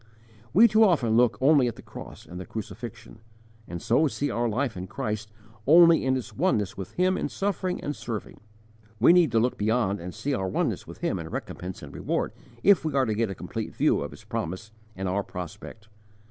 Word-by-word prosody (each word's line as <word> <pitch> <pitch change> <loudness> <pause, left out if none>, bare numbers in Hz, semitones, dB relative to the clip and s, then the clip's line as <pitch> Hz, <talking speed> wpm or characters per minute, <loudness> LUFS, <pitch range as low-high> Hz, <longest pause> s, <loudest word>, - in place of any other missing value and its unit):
_ - - -28 0.5
We 220 +8 +7
too 220 +1 +5
often 140 - +3
look 120 -3 +4
only 140 -1 +5
at 120 - -3
the - - -13
cross - - -10
and 90 - -8
the 90 - -6
crucifixion, 115 +2 -8 0.5
and 85 0 -5
so 125 - +3
see 145 +1 -2
our 120 0 0
life 120 +1 -1
in 90 +1 -6
Christ 105 +2 -4 0.4
only 165 +2 +7
in 130 0 +2
its 125 - -7
oneness 110 - +1
with 95 -2 -7
Him 185 +1 +2
in - - -2
suffering 190 -2 -2
and 145 - -3
serving; 115 -3 -6 0.6
we 125 +9 +7
need 175 -6 +5
to 115 - +3
look 125 +3 0
beyond 105 -1 +1
and 90 +2 -6
see 140 +10 -3
our 95 -7 -1
oneness 95 - -1
with - - -11
Him - - 0
in - - -6
recompense 90 +1 -6
and - - -10
reward, - - -2 0.3
if 200 -3 +5
we 155 -3 -2
are 135 -1 +3
to 110 - 0
get 110 0 0
a 95 - -5
complete - - -5
view - - +2
of - - -4
His - - -13
promise 95 +7 -4 0.2
and 95 0 -3
our 95 +2 0
prospect. 90 +4 -8
115 Hz, 215 wpm, -26 LUFS, 100-145 Hz, 0.6 s, We